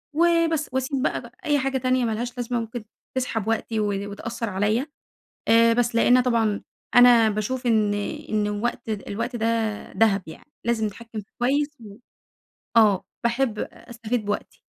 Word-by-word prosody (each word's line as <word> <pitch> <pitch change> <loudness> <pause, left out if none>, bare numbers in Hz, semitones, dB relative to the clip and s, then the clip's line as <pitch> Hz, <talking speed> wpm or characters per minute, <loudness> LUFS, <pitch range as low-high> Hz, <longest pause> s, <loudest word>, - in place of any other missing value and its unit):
وبس، 335 -2 +2
وأسيب 260 +1 -1
بقى - - 0
بقى - - -14
أي 295 -2 +3
حاجة 270 0 0
تانية 255 -1 +1
مالهاش 235 +2 -3
لازمة 245 0 -1
ممكن 230 0 -6 0.3
تسحب 225 -4 -1
وقتي 225 0 -1
و 210 - +1 0.3
وتأثر 230 +2 -4
عليَّ، 210 +7 +1 0.6
آآ 230 0 +6
بس 240 0 +1
لأنها 245 +2 +5
طبعًا، 225 -4 +1 0.3
أنا 245 -2 +7
باشوف 215 +5 -2
إن 215 -3 +3 0.3
إن 210 -1 +1
الوقت 215 +2 -2
د 210 -2 -3
الوقت 230 +4 -3
ده 225 0 -1 0.5
دهب 205 -4 +3
يعني، 160 - -12
لازم 230 -2 +1
نتحكم 225 +1 -7
فيه 200 - -19
كويس، 280 +4 +2
و 210 -3 -11 0.8
آه، 210 -4 +5 0.2
باحب 235 -2 0
أستفيد 230 -1 -4
بوقتي. 205 0 -4
230 Hz, 155 wpm, -24 LUFS, 215-250 Hz, 0.8 s, أنا